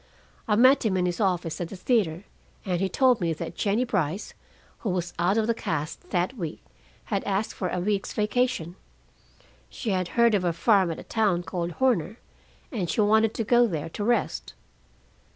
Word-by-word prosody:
I 210 Hz, -, +3 dB
met 255 Hz, +5 st, +6 dB
him 200 Hz, -5 st, +1 dB
in 180 Hz, -, +1 dB
his 175 Hz, -1 st, -2 dB
office 175 Hz, -4 st, 0 dB
at 170 Hz, -, -3 dB
the -, -, -7 dB
theater, 185 Hz, -5 st, 0 dB, 0.4 s
and 180 Hz, -2 st, -1 dB
he 195 Hz, -, +1 dB
told 250 Hz, +1 st, +3 dB
me 165 Hz, -2 st, +1 dB
that 165 Hz, +1 st, -6 dB
Jennie 210 Hz, +4 st, +1 dB
Brice, 190 Hz, -5 st, -2 dB, 0.5 s
who 220 Hz, -, -3 dB
was 180 Hz, -1 st, -2 dB
out 180 Hz, +5 st, +2 dB
of 220 Hz, -, +2 dB
the 230 Hz, -, +2 dB
cast 155 Hz, -8 st, -4 dB
that 180 Hz, +7 st, 0 dB
week, 170 Hz, -8 st, -6 dB, 0.5 s
had 195 Hz, -, 0 dB
asked 200 Hz, +2 st, -1 dB
for 185 Hz, -, -3 dB
a 180 Hz, -, -2 dB
week's 200 Hz, +2 st, -1 dB
vacation. 210 Hz, -5 st, -1 dB, 0.9 s
She 225 Hz, -, -4 dB
had 185 Hz, -2 st, 0 dB
heard 235 Hz, -1 st, +5 dB
of 200 Hz, -3 st, +2 dB
a 175 Hz, -1 st, +1 dB
farm 190 Hz, +1 st, +3 dB
at 165 Hz, -, -4 dB
a -, -, -8 dB
town 205 Hz, -6 st, +1 dB
called 175 Hz, -1 st, -3 dB
Horner, 225 Hz, -6 st, +1 dB, 0.5 s
and 190 Hz, -9 st, -2 dB
she -, -, -1 dB
wanted 220 Hz, +1 st, +3 dB
to 225 Hz, -, -1 dB
go 240 Hz, +2 st, +4 dB
there 165 Hz, -6 st, -4 dB
to 205 Hz, -, -5 dB
rest. 240 Hz, +3 st, -1 dB
195 Hz, 190 wpm, -26 LUFS, 175-225 Hz, 0.9 s, met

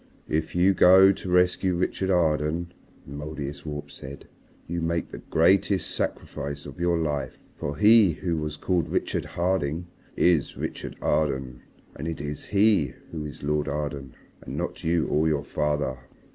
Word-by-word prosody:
"If 80 Hz, +2 st, -1 dB
you 90 Hz, +2 st, +4 dB
go 95 Hz, +1 st, +7 dB
to 95 Hz, -1 st, -6 dB
rescue 90 Hz, +1 st, +3 dB
Richard 95 Hz, +2 st, -1 dB
Arden," 85 Hz, -1 st, +1 dB, 0.3 s
the 70 Hz, -, -10 dB
Mouldiestwarp 75 Hz, 0 st, -6 dB
said, 70 Hz, +2 st, -10 dB, 0.4 s
"you 85 Hz, +1 st, -3 dB
make 85 Hz, 0 st, -1 dB
the -, -, -7 dB
greatest 95 Hz, +3 st, +3 dB
sacrifice 70 Hz, 0 st, -4 dB
of -, -, -10 dB
your 85 Hz, -1 st, +2 dB
life. 75 Hz, -3 st, -2 dB, 0.2 s
For 70 Hz, 0 st, -4 dB
he 105 Hz, -1 st, +6 dB
who 85 Hz, +1 st, -2 dB
was 75 Hz, -1 st, -3 dB
called 90 Hz, -2 st, 0 dB
Richard -, -, -1 dB
Harding 85 Hz, -2 st, -1 dB, 0.3 s
is 85 Hz, -5 st, +2 dB
Richard -, -, -5 dB
Arden, 65 Hz, -5 st, 0 dB, 0.3 s
and 80 Hz, -, -5 dB
it 80 Hz, -, -4 dB
is 75 Hz, 0 st, -5 dB
he 100 Hz, -, +3 dB, 0.2 s
who 80 Hz, -2 st, -5 dB
is 75 Hz, -, -11 dB
Lord 75 Hz, +1 st, 0 dB
Arden 70 Hz, -3 st, -4 dB, 0.3 s
and -, -, -7 dB
not -, -, -4 dB
you 80 Hz, -1 st, +2 dB
or 75 Hz, +2 st, +1 dB
your 75 Hz, -2 st, +1 dB
father. 75 Hz, -3 st, -1 dB
80 Hz, 155 wpm, -26 LUFS, 75-90 Hz, 0.4 s, go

